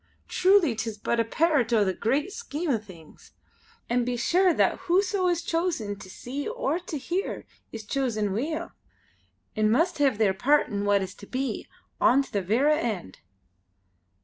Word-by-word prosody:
Truly 370 - +4
'tis 225 -1 -4
but 230 +3 -1
a - - +4
pairt 285 0 +1
o' 220 -3 +4
the 190 - 0
great 285 - -1
scheme 345 -9 -3
o' 230 - +1
things; 180 -7 -16 0.5
an' 245 +1 +1
be 245 0 -2
sure 360 +9 +3
that - - +2
whoso 375 +1 +2
is 345 -1 0
chosen 330 - -1
to 185 - -11
see 265 +8 -6
or 480 -7 -1
to 325 -3 -6
hear 350 +8 -3 0.3
is 220 -2 -8
chosen 215 -6 -1
weel, 300 +9 -3 0.8
an' 215 0 +2
must 320 +8 +2
hae 285 -1 +5
their 210 -5 +1
pairt 285 +9 +2
in 200 0 -2
what 200 -1 +3
is 185 -1 -6
to 200 - -13
be, 265 +1 -3 0.3
on 275 +3 +4
to - - -16
the 200 - +1
verra 265 - +2
end." 200 - -4
255 Hz, 175 wpm, -26 LUFS, 215-330 Hz, 0.8 s, hae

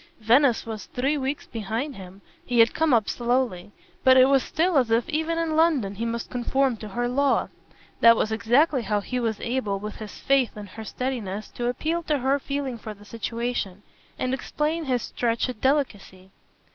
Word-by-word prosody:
Venice 240 +3 +3
was 220 -3 -6
three 270 +4 0
weeks 275 0 -3
behind 230 +6 -4
him 190 0 -11 0.2
he 245 - -2
had 230 0 +6
come 320 -2 +1
up 225 -5 +3
slowly; 240 -6 -1 0.3
but 260 0 +7
it 255 - +8
was 270 0 +4
still 330 +2 +1
as 245 -3 0
if 230 +1 +2
even 320 +1 -1
in 330 -1 -1
London 305 -11 +2
he 225 +4 -4
must 230 0 -4
conform 255 +1 +1
to 215 - -8
her 240 +4 -2
law. 275 +3 +1 0.5
That 230 0 +7
was 215 - 0
exactly 250 +6 +3
how 210 -1 -1
he 250 +5 -3
was 225 -3 -1
able, 235 -5 -1
with 210 +2 -7
his 215 -2 -9
faith 270 -5 +1
in 210 - -7
her 210 +3 -9
steadiness, 220 -4 -4
to 240 - -4
appeal 315 +7 -1
to 300 - +1
her 270 +2 +1
feeling 275 -3 -4
for 215 -1 -7
the 205 +1 -17
situation 230 -3 -4 0.3
and 255 0 -1
explain 305 +4 -2
his 250 -3 0
stretched 235 0 -2
delicacy. 205 -9 -1
245 Hz, 185 wpm, -25 LUFS, 220-275 Hz, 0.5 s, it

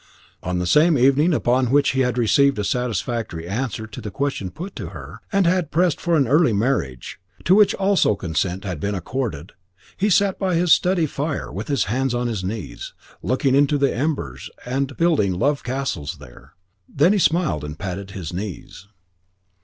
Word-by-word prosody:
On 90 0 -2
the 90 - -1
same 150 - +4
evening 140 +7 +4
upon 125 -4 +1
which 140 +2 +3
he 135 - -1
had 125 -2 +1
received 140 +4 +3
a 105 - -1
satisfactory 115 -6 -2
answer 110 +2 -3
to 110 - -9
the 105 - -5
question 135 -4 -3
put 180 - -8
to - - -5
her, - - -10
and 195 -2 +2
had 175 -3 +1
pressed 170 0 +1
for 170 -1 +1
an 135 -4 +2
early 145 -2 +4
marriage, 100 - -2 0.3
to 180 - +5
which 205 0 +5
also 195 - +2
consent 90 +1 -2
had 90 -6 -4
been 100 +5 -2
accorded, 95 - -4 0.4
he 205 - 0
sat 200 0 +2
by 185 -3 0
his 170 0 +4
study 180 -2 +2
fire, 145 +1 -3
with - - -6
his 140 -8 +1
hands 125 +4 -1
on 120 0 -1
his 110 -6 -2
knees, 95 - -6 0.3
looking 130 +2 0
into 145 +1 +3
the 140 -1 +1
embers 115 - -3 0.2
and 135 +2 -2
building 155 - +2
love 145 +8 0
castles 115 - -3
there. 70 -4 -15 0.4
Then 160 +8 +3
he 210 - +2
smiled 165 - +1
and 75 0 -7
patted 100 0 -5
his 90 -4 -7
knees. 95 0 -7
130 Hz, 185 wpm, -22 LUFS, 95-155 Hz, 0.4 s, to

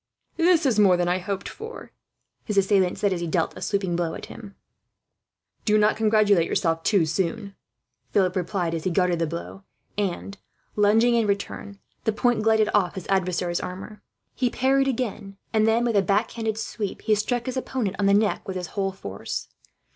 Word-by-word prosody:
"This 340 -2 +3
is 235 -6 +2
more 190 -4 +6
than 175 0 0
I 180 +1 +1
hoped 195 +1 -4
for," 450 +3 -9 0.5
his 210 -3 -3
assailant 195 -2 +3
said, 200 -2 +1
as 175 - -3
he 170 - -2
dealt 165 0 0
a - - -9
sweeping 195 -4 -1
blow 170 -2 -1
at - - -7
him. 205 -4 -11 1.1
"Do 215 -1 +3
not 210 0 +3
congratulate 215 -5 +3
yourself 165 -1 0
too 190 -2 +3
soon," 190 +4 -2 0.6
Philip 185 -2 +2
replied, 180 -2 -1
as 165 -1 -3
he - - 0
guarded 180 -1 +1
the 165 - +1
blow 170 +4 -7 0.4
and, 195 0 -3 0.4
lunging 220 +3 +4
in 230 -2 +2
return, 200 0 -3 0.3
the 220 - +3
point 240 +1 +1
glided 220 -1 +3
off 190 -3 +2
his 190 - -6
adversary's 180 -2 0
armour. 190 +3 -7 0.3
He 250 -1 0
parried 270 +2 +2
again; 220 -6 -3 0.2
and 215 0 +3
then, 230 +2 +3
with 235 -2 0
a 200 - +5
back 200 +3 +1
handed 220 -2 -3
sweep, 220 -2 -4
he 215 - +3
struck 235 +3 0
his 255 - -3
opponent 250 -6 -2
on 200 - +2
the 200 - +5
neck 210 0 +1
with 190 - -4
his 180 -1 -5
whole 195 -1 -1
force. 100 - -6
200 Hz, 190 wpm, -25 LUFS, 180-220 Hz, 1.1 s, more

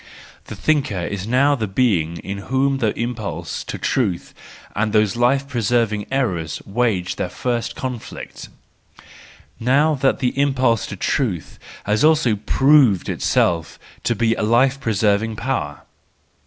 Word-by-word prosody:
The - - -8
thinker 140 -12 0
is 100 +1 -4
now 135 +5 +3
the 115 -6 -2
being 95 -7 +1
in 100 +1 -5
whom 135 +1 +1
the 110 -4 +1
impulse 115 -4 -4
to - - -5
truth 105 -10 -1 0.4
and 105 +1 0
those 105 -2 +3
life¬ 130 +3 +1
preserving 115 -4 0
errors 95 -12 -1
wage 100 -4 -1
their - - -2
first 120 -2 -3
conflict, 125 -3 -7 1.1
now 140 +6 +3
that 135 -1 +1
the 125 -1 -1
impulse 130 -6 +2
to - - -6
truth 90 - -2 0.2
has 105 +4 +1
also 155 -8 +4
proved 130 - +3
itself 85 -3 0 0.3
to 120 - +1
be 115 +1 +2
a - - -4
life 125 +5 +3
preserving 110 -1 +1
power. 105 - -3
115 Hz, 135 wpm, -20 LUFS, 100-130 Hz, 1.1 s, also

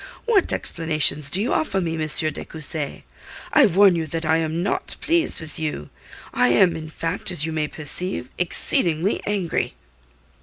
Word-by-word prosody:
What 435 -6 +3
explanations 155 -3 +2
do 180 - +1
you 225 +6 0
offer 250 -11 0
me, 170 -3 -2
M. 155 -1 -2
de 155 +1 0
Cussy? 155 -2 -5 0.5
I - - +6
warn 195 0 +5
you 165 -1 -2
that 165 +2 -4
I 160 +1 +2
am 165 +1 -2
not 200 - -2
pleased 330 +1 +1
with 160 -1 -4
you. 150 - -5 0.4
I 125 - +3
am, 165 +8 +3
in 155 -1 -7
fact, 165 +3 -3
as 160 -4 0
you 160 - -4
may 155 -1 -1
perceive, 150 -2 -1
exceedingly 175 +1 +1
angry." 195 - -2
165 Hz, 165 wpm, -22 LUFS, 155-180 Hz, 0.5 s, I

